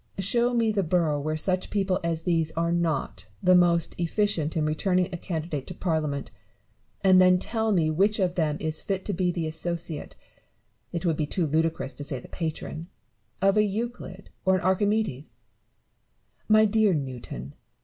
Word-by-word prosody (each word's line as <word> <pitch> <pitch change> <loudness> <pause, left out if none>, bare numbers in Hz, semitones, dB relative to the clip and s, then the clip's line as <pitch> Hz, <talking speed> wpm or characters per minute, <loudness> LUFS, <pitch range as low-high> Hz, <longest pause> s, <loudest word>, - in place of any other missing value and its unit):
Show 235 +6 +2
me 230 -2 +2
the 205 -2 +1
borough 165 -4 +1
where 155 +2 -2
such 185 +3 0
people 195 -2 0
as 165 -1 -1
these 165 -2 +1
are 170 +1 0
not 170 -4 -1 0.2
the 185 0 +5
most 175 -2 +4
efficient 170 -3 0
in 155 - +1
returning 180 +4 +1
a - - -2
candidate 160 -5 -4
to 180 - -7
Parliament; 155 -6 -2 0.7
and 185 -1 +6
then 185 0 +6
tell 220 +3 -1
me 165 -5 +2
which 200 +7 +2
of 185 -4 +1
them 155 -4 0
is 155 -1 -2
fit 195 -1 -3
to 205 - -2
be 180 0 0
the 170 -2 -2
associate 165 0 -4 0.4
— - - -45 0.3
it 170 +1 -4
would 165 -3 +1
be 150 - -1
too 175 +2 0
ludicrous 160 -2 0
to 145 - -7
say 140 -3 -2
the - - -13
patron 160 0 -5 0.3
— 110 +5 -42
of 195 +1 +4
a 210 - +5
Euclid 210 -2 -5
or 190 0 +3
an 185 - -1
Archimedes 185 - 0 1.1
1 215 0 +7
My - - +5
dear 215 -3 +3
Newton 120 - -6
175 Hz, 180 wpm, -26 LUFS, 155-195 Hz, 1.1 s, 1